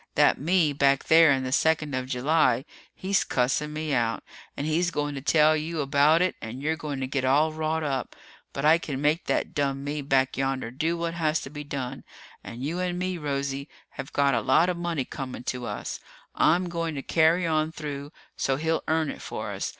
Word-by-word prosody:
That -, -, +4 dB
me 165 Hz, -1 st, +2 dB
back 140 Hz, -1 st, +3 dB
there 160 Hz, -2 st, +6 dB
in 135 Hz, -1 st, +1 dB
the 130 Hz, -, -3 dB
second 150 Hz, 0 st, +2 dB
of 130 Hz, 0 st, -2 dB
July, 130 Hz, 0 st, +2 dB, 0.3 s
he's 195 Hz, +1 st, +1 dB
cussing 135 Hz, +4 st, 0 dB
me 155 Hz, -1 st, -3 dB
out. 115 Hz, -3 st, 0 dB, 0.3 s
And 145 Hz, -, -2 dB
he's 165 Hz, +3 st, +1 dB
going 145 Hz, -3 st, -2 dB
to 135 Hz, -, -5 dB
tell 155 Hz, +2 st, +4 dB
you 155 Hz, +1 st, -3 dB
about 145 Hz, +4 st, +4 dB
it 185 Hz, -, +1 dB
and 110 Hz, +3 st, -6 dB
you're 155 Hz, +3 st, 0 dB
going 150 Hz, -3 st, -5 dB
to -, -, 0 dB
get 135 Hz, 0 st, -2 dB
all 150 Hz, +4 st, +3 dB
wrought 155 Hz, 0 st, -1 dB
up. 140 Hz, -3 st, -3 dB, 0.4 s
But 140 Hz, -, -3 dB
I 160 Hz, +2 st, +6 dB
can 145 Hz, -5 st, -4 dB
make 150 Hz, +4 st, +1 dB
that -, -, -1 dB
dumb 140 Hz, -3 st, -1 dB
me 145 Hz, +1 st, -3 dB
back 135 Hz, -2 st, +1 dB
yonder 135 Hz, -3 st, -1 dB
do 160 Hz, +6 st, -1 dB
what 170 Hz, 0 st, -2 dB
has 160 Hz, -2 st, 0 dB
to 135 Hz, -, -8 dB
be 150 Hz, 0 st, -6 dB
done. 140 Hz, -3 st, -5 dB, 0.4 s
And 120 Hz, +2 st, -8 dB
you 165 Hz, +6 st, -2 dB
and 180 Hz, -1 st, -1 dB
me, 180 Hz, -1 st, -2 dB
Rosie, 140 Hz, -1 st, -3 dB, 0.2 s
have 135 Hz, -, -8 dB
got 140 Hz, -1 st, +2 dB
a 115 Hz, -, +1 dB
lot 135 Hz, +8 st, +3 dB
of 180 Hz, -, 0 dB
money 170 Hz, -6 st, -2 dB
coming 130 Hz, -2 st, -7 dB
to 125 Hz, -1 st, -4 dB
us. -, -, -5 dB, 0.3 s
I'm 180 Hz, +2 st, +3 dB
going 165 Hz, -2 st, -3 dB
to 135 Hz, -, -5 dB
carry 165 Hz, +2 st, +3 dB
on 155 Hz, -1 st, +1 dB
through 145 Hz, -2 st, -6 dB, 0.2 s
so 135 Hz, -, 0 dB
he'll 160 Hz, +3 st, 0 dB
earn 160 Hz, -1 st, +1 dB
it -, -, -10 dB
for -, -, -5 dB
us. -, -, -3 dB
150 Hz, 210 wpm, -26 LUFS, 135-160 Hz, 0.4 s, there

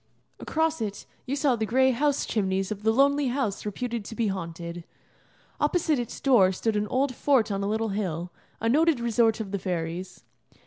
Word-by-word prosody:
Across 320 Hz, -3 st, 0 dB
it 205 Hz, -2 st, -4 dB, 0.2 s
you 270 Hz, -, -1 dB
saw 280 Hz, -3 st, +2 dB
the 220 Hz, -, -2 dB
gray 260 Hz, +3 st, +4 dB
house 285 Hz, +3 st, +1 dB
chimneys 195 Hz, -2 st, -1 dB
of 205 Hz, -1 st, -4 dB
the 220 Hz, +1 st, +3 dB
lonely 280 Hz, +3 st, +3 dB
house 240 Hz, -6 st, -2 dB
reputed 235 Hz, +1 st, -3 dB
to 225 Hz, -, -7 dB
be 225 Hz, -2 st, 0 dB
haunted. 170 Hz, -2 st, -5 dB, 0.8 s
Opposite 320 Hz, -6 st, +1 dB
its 240 Hz, -, -5 dB
door 235 Hz, -9 st, +5 dB
stood 215 Hz, +4 st, -1 dB
an 210 Hz, 0 st, 0 dB
old 260 Hz, +2 st, 0 dB
fort 250 Hz, -4 st, +2 dB
on 195 Hz, 0 st, -1 dB
a -, -, -1 dB
little 220 Hz, +1 st, 0 dB
hill, 180 Hz, -4 st, -3 dB, 0.3 s
a 225 Hz, -, -1 dB
noted 305 Hz, +3 st, +3 dB
resort 230 Hz, -1 st, +2 dB
of 205 Hz, -3 st, -5 dB
the 200 Hz, -, -2 dB
fairies. 180 Hz, 0 st, -4 dB
225 Hz, 185 wpm, -26 LUFS, 195-265 Hz, 0.8 s, door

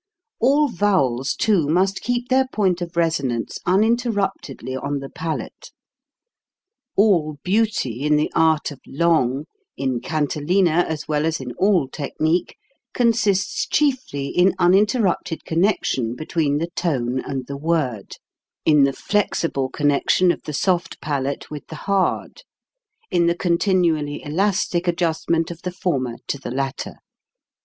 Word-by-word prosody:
All 285 Hz, +5 st, +4 dB
vowels, 170 Hz, -, +1 dB
too, 195 Hz, -9 st, +2 dB
must 190 Hz, +5 st, +1 dB
keep 245 Hz, 0 st, -2 dB
their 260 Hz, 0 st, +3 dB
point 190 Hz, -7 st, 0 dB
of 170 Hz, 0 st, -6 dB
resonance 140 Hz, -8 st, 0 dB
uninterruptedly 200 Hz, -, 0 dB
on 140 Hz, +2 st, -2 dB
the 135 Hz, 0 st, -7 dB
palate. 160 Hz, 0 st, -5 dB, 1.3 s
All 170 Hz, -8 st, +3 dB
beauty 190 Hz, -, 0 dB
in 150 Hz, +1 st, +3 dB
the 150 Hz, -, +1 dB
art 160 Hz, -2 st, +2 dB
of 140 Hz, -, -10 dB
long, 150 Hz, -3 st, +1 dB, 0.3 s
in 130 Hz, -2 st, -1 dB
cantilena 160 Hz, +5 st, +1 dB
as 155 Hz, -2 st, -4 dB
well 150 Hz, -1 st, 0 dB
as 160 Hz, 0 st, 0 dB
in 130 Hz, -2 st, -6 dB
all 185 Hz, -, +2 dB
technique, 155 Hz, +5 st, -1 dB, 0.4 s
consists 220 Hz, -5 st, +1 dB
chiefly 255 Hz, -, 0 dB
in 185 Hz, +2 st, +3 dB
uninterrupted 195 Hz, -1 st, +2 dB
connection 160 Hz, -, 0 dB
between 155 Hz, 0 st, -1 dB
the 165 Hz, +3 st, -3 dB
tone 130 Hz, -7 st, -1 dB
and 130 Hz, -1 st, -4 dB
the 140 Hz, -, -6 dB
word, 140 Hz, -9 st, -2 dB, 0.5 s
in 150 Hz, -3 st, +5 dB
the 135 Hz, -, 0 dB
flexible 165 Hz, -10 st, -1 dB
connection 145 Hz, +6 st, +2 dB
of -, -, -5 dB
the 150 Hz, -, -5 dB
soft 180 Hz, +4 st, 0 dB
palate 140 Hz, -1 st, -3 dB
with 150 Hz, -1 st, -7 dB
the 160 Hz, -, -8 dB
hard, 200 Hz, -, 0 dB, 0.7 s
in 170 Hz, -1 st, +3 dB
the 170 Hz, -, +2 dB
continually 170 Hz, -4 st, +1 dB
elastic 180 Hz, +2 st, 0 dB
adjustment 165 Hz, -1 st, 0 dB
of 170 Hz, -, -9 dB
the 180 Hz, -, -4 dB
former 135 Hz, -10 st, -2 dB
to 140 Hz, -, -3 dB
the 130 Hz, -, -6 dB
latter. 135 Hz, +1 st, -3 dB
165 Hz, 130 wpm, -22 LUFS, 140-190 Hz, 1.3 s, in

